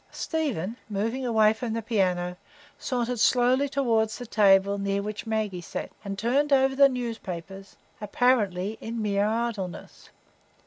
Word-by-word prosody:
Stephen, 240 - -3
moving 225 +6 -2
away 220 -2 +4
from 225 0 -4
the 230 - -2
piano, 180 -5 0 0.4
sauntered 245 -1 -2
slowly 255 +4 +3
toward 230 -6 +1
the 245 +3 -7
table 200 -2 +4
near 200 0 -1
which 210 +2 -5
Maggie 215 -5 -2
sat, - - -6
and 200 -1 -5
turned 265 +7 +1
over 265 -1 +4
the 275 0 +6
newspapers, 195 -6 -6 0.3
apparently 210 -3 +1
in 230 +1 -5
mere 205 -1 +1
idleness. 220 -5 -4
220 Hz, 135 wpm, -26 LUFS, 200-245 Hz, 0.4 s, the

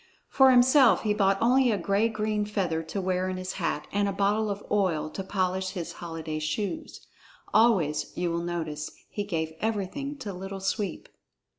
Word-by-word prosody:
For 265 -1 +6
himself 255 +1 +6
he 210 -2 +2
bought 195 -2 +2
only 250 +3 +4
a 215 - +2
gay 200 +5 +1
green 215 -1 -1
feather 190 -6 -1
to 165 +5 -5
wear 185 0 0
in 185 - -3
his 185 0 -4
hat 150 -2 -1
and 200 0 +1
a - - 0
bottle 205 +2 +1
of 200 0 -4
oil 165 -7 +1
to 195 - -5
polish 185 -1 -1
his 175 -4 -4
holiday 165 -2 -5
shoes. 200 - -4 0.5
Always, 185 -11 +3
you 175 -1 0
will 170 0 -1
notice, 160 -3 -4 0.2
he 205 - -2
gave 160 -5 -3
everything 225 +7 -2
to 215 -7 -6
Little 195 +2 -6
Sweep. 195 -1 -2
195 Hz, 175 wpm, -27 LUFS, 170-215 Hz, 0.5 s, For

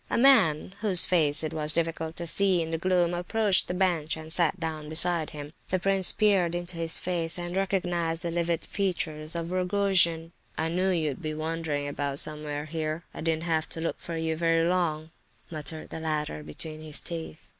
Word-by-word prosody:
A - - 0
man, 220 - +4
whose 200 -5 +7
face 155 -4 +3
it 155 - -3
was 155 -1 +1
difficult 165 -1 -2
to 170 - -5
see 180 +1 +2
in 160 - -6
the 165 - -2
gloom, 175 -1 +1
approached 190 +3 +1
the 180 - -3
bench, 175 -5 0
and 160 0 +1
sat 175 +1 +3
down 155 -2 -5
beside 165 0 +3
him. 150 -1 -9 0.2
The 185 - +1
prince 195 0 +4
peered 190 -5 +2
into 175 0 -4
his 165 -1 +2
face, 170 -2 0
and 175 0 -5
recognized 175 -4 -1
the 170 - -2
livid 170 -1 -1
features 160 -5 -2
of 170 0 -4
Rogojin. 180 -3 +1 0.3
"I 160 +1 -1
knew 185 +3 0
you'd 155 -6 -1
be 155 -2 -4
wandering 155 -2 -3
about 140 -1 -3
somewhere 150 -1 -1
here. 155 +1 -4
I - - -8
didn't 160 0 0
have 160 -2 -1
to - - -3
look 165 - -3
for 165 -1 -6
you 160 0 -1
very 165 0 +1
long," 165 -3 -1 0.4
muttered 155 0 -4
the - - -6
latter 150 - -3
between 155 - -9
his 155 -1 -3
teeth. 165 -2 -7
165 Hz, 190 wpm, -27 LUFS, 155-180 Hz, 0.4 s, whose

